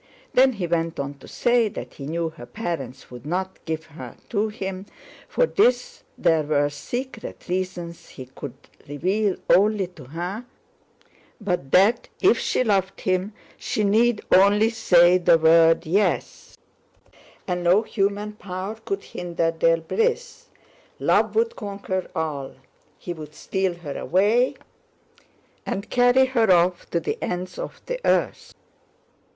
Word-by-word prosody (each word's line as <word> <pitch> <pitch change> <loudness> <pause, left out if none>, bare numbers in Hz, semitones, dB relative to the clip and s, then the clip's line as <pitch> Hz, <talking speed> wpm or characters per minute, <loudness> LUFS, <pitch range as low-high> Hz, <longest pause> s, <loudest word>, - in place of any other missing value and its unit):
Then 260 +1 +5
he 195 -5 -3
went 165 -1 -1
on 140 0 -3
to - - -14
say 240 -2 +2
that - - -8
he 140 - -8
knew 165 +1 -2
her 120 -6 -12
parents 140 - -5
would 125 -1 -10
not 185 +5 -4
give 160 -1 -3
her 160 +1 -10
to 215 0 0
him—for 195 - -4
this 250 - +1 0.2
there 165 -3 +3
were 145 -1 +1
secret 240 - -6
reasons 180 -2 -4
he 130 - -10
could 130 0 -9 0.3
reveal 190 +7 0
only 205 0 +4
to 175 -7 -14
her—but 180 - -7
that 200 - +3
if - - +4
she - - 0
loved 195 -4 0
him 185 +2 -1 0.2
she 215 - -2
need 220 +2 +2
only 205 +4 +5
say 180 -5 +5
the 170 -1 +5
word 165 +1 +5
yes, 175 - -1 0.9
and 180 0 -2
no 180 +5 +4
human 205 0 -1
power 195 +1 -6
could 195 0 -3
hinder 170 -2 -2
their 165 0 +2
bliss. 460 - -2 0.5
Love - - +2
would 460 +1 +1
conquer 200 -3 -4
all. 150 -4 -3 0.4
He 175 - -6
would 155 -2 -10
steal 190 0 -2
her 155 -5 -7
away 215 +8 +2 1.1
and 200 +2 -5
carry 245 +1 +5
her 235 -6 +2
off 175 0 +2
to 170 - 0
the 165 - -3
ends 180 - -4
of - - -6
the - - -3
earth. - - 0
185 Hz, 135 wpm, -23 LUFS, 165-215 Hz, 1.1 s, Then